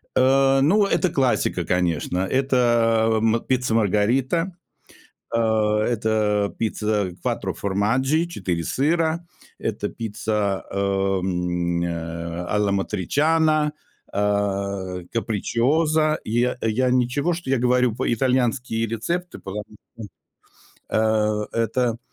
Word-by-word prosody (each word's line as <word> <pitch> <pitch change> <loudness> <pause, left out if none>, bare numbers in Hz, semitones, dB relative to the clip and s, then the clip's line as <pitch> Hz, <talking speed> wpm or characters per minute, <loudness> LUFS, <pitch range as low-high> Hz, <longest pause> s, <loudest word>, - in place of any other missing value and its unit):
Э, 135 +1 +4
ну, 200 +8 +4
это 185 -2 +1
классика, 135 -4 0
конечно. 90 -1 0
Это, 120 0 +2
эм, 110 +1 +1
пицца 125 -3 0
Маргарита, 125 - +1 0.8
э, 115 - +2
это 110 -1 +1
пицца 105 -3 -1
quattro - - -2
formaggi 130 - +1
4 90 - -3
сыра, 160 - 0 0.3
это - - -3
пицца, 105 -2 -2
эм, 90 -3 0
э, 85 0 -4
a 105 - +1
la 105 -1 +1
matriciana, 150 - +1 0.4
э, 100 -2 -1
capricciosa. 150 +8 +1
Я, 120 +3 0
я 120 +3 +1
ничего, 130 +7 +1
что 165 -5 -6
я 135 - +3
говорю 125 -1 +2
по 125 0 -1
итальянские 120 -2 0
рецепты, 170 +12 -3
потому 100 +2 -6 1.3
что, 110 -1 +1
э, - - -3
это, 115 +1 0
115 Hz, 105 wpm, -23 LUFS, 100-130 Hz, 1.3 s, Э